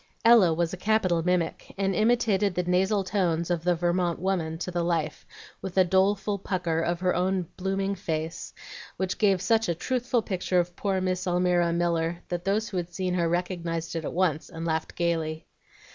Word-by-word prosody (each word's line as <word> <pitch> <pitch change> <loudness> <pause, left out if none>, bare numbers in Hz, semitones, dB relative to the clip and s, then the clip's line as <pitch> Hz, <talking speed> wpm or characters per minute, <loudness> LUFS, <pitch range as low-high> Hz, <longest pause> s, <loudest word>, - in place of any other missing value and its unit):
Ella 230 -7 +7
was 170 +1 0
a - - -4
capital 185 -4 +2
mimic, 175 -1 -1
and 195 0 +1
imitated 215 -2 +2
the 180 - 0
nasal 190 +3 +2
tones 180 -3 0
of 170 -2 -1
the 175 0 +2
Vermont 175 0 0
woman 170 -3 -1
to 180 +2 -4
the 175 -1 -1
life, 165 -3 -2 0.3
with 190 -1 -6
a 185 - +7
doleful 195 +2 +1
pucker 175 -4 -1
of 170 +1 -1
her 185 -1 +2
own 185 0 0
blooming 195 +1 -1
face, 165 -4 -4 0.5
which 190 0 -2
gave 195 -3 +3
such 225 -3 +2
a 170 - +1
truthful 245 +4 -1
picture 185 -2 0
of 175 0 -2
poor 195 -2 -1
Miss 185 0 -1
Almira 175 -1 +2
Miller 170 0 0
that 175 0 -3
those 215 +3 0
who 190 - -4
had 175 0 -3
seen 180 0 -2
her 170 -2 +1
recognized 170 -2 -2
it 165 - -2
at - - -3
once, 170 -4 0
and 165 +1 -6
laughed 160 -1 -2
gayly. 160 -2 -1
180 Hz, 190 wpm, -27 LUFS, 170-195 Hz, 0.5 s, Ella